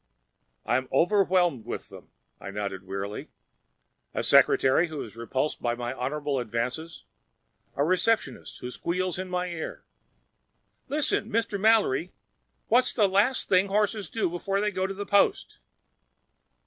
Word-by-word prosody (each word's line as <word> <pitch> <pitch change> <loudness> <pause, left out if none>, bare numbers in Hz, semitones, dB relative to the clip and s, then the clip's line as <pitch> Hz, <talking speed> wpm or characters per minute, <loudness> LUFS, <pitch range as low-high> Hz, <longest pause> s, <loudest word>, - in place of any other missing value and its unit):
"I'm 130 +3 0
overwhelmed 180 - +2
with - - -5
them," - - -13 0.3
I - - -8
nodded 100 -2 -5
wearily. 100 +2 -5 0.9
"A - - -1
secretary 135 +6 +4
who 155 -6 -6
repulses 115 +7 -3
my 120 0 -2
honorable 140 +2 -2
advances, 125 +8 -4 0.7
a 140 - +1
receptionist 185 - 0
who 125 - -5
squeals 180 +4 -2
in 185 0 -5
my 180 0 -2
ear—" 165 -2 -6 1.0
"Listen, 285 -6 0
Mr. 220 -2 -1
Mallory, 200 -7 +3 0.5
what's 250 +2 +3
the 210 -4 +3
last 205 +7 +2
thing 185 +1 +4
horses 205 -2 0
do 225 - 0
before 185 +3 -2
they 210 +1 0
go 190 -1 -1
to 195 - -4
the 205 +1 -5
post?" 200 - +2
175 Hz, 130 wpm, -27 LUFS, 125-200 Hz, 1.0 s, secretary